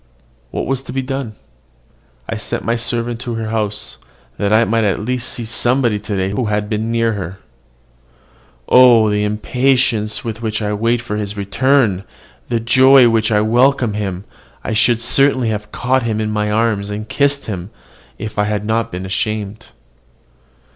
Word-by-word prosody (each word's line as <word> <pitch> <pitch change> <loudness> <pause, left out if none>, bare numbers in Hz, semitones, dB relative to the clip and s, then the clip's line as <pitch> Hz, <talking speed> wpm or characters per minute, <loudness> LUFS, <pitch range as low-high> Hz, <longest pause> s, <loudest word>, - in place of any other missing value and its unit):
What - - -3
was 135 -1 -1
to - - -9
be 135 0 -1
done? 135 -3 -4 0.9
I - - -3
sent - - -4
my 115 - +1
servant 115 0 -2
to 120 -1 -4
her 110 -1 -4
house, 105 -2 -3 0.4
that 100 0 0
I 110 +2 +5
might 115 0 +1
at 105 0 0
least 125 0 -2
see 120 - -5
somebody 120 -1 +1
to 105 0 -4
day 95 0 -1
who 110 +4 -1
had 105 0 -1
been 110 +1 -2
near 115 -1 +1
her. 95 -2 -5 1.3
Oh, 120 -4 +6
the 105 0 0
impatience 115 +1 0
with 115 -1 -5
which 110 -2 -2
I 105 -1 -2
waited 115 +3 0
for 105 -3 -4
his 105 -1 -4
return! 100 0 +1 0.5
the 120 -2 0
joy 130 +3 +6
with - - 0
which 110 -1 +1
I 105 -1 +3
welcomed 120 0 +2
him! 95 -3 -3 0.4
I - - -3
should 115 +1 +2
certainly 130 0 +2
have 105 -1 -4
caught 130 +1 +1
him 110 -2 -2
in 110 0 -1
my 105 0 -1
arms, 105 -2 0
and 105 +1 -5
kissed 140 +3 +1
him, 95 -3 -5 0.5
if 110 -1 -6
I 105 - +3
had 105 0 -2
not 115 +1 -1
been 90 +1 -5
ashamed. 105 +2 -3
110 Hz, 175 wpm, -17 LUFS, 105-120 Hz, 1.3 s, Oh